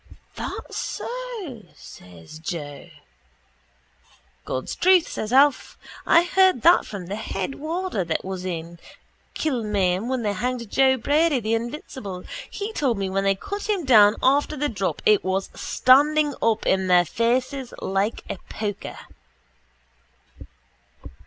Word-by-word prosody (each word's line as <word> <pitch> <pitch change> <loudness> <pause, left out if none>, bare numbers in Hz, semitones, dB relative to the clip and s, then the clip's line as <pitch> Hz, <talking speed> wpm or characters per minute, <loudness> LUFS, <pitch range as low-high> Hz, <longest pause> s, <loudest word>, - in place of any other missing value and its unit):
—That - - -6
so? 470 - -5
says 90 - -13
Joe. 155 -2 -6 1.6
—God's 130 - -4
truth, 365 -2 +4
says 215 - -5
Alf. 275 +1 +3 0.3
I 335 - +6
heard 370 -7 +3
that 345 - +5
from 200 -4 -7
the 195 +4 -5
head 210 +1 -4
warder 325 - -3
that 165 +1 -2
was 190 -1 -5
in 170 -2 -5 0.6
Kilmainham 210 - 0
when 260 -2 -1
they 205 -1 0
hanged 240 +1 -3
Joe 265 -1 +4
Brady, 290 +3 +2
the 220 0 -2
invincible. 230 -5 -5 0.3
He 420 +2 -5
told 260 - 0
me 195 -1 -2
when 195 +1 0
they 195 0 +3
cut 405 - -6
him 390 -6 0
down 215 -4 +6
after 285 +3 +2
the 295 +2 0
drop 195 -4 -3
it 210 -2 +4
was 190 +1 -2
standing 295 +3 +3
up 225 -1 +1
in 190 0 +1
their 180 -1 +5
faces 250 - -1
like 195 +3 -1
a 185 - -5
poker. 205 -2 -5
230 Hz, 135 wpm, -23 LUFS, 190-290 Hz, 1.6 s, I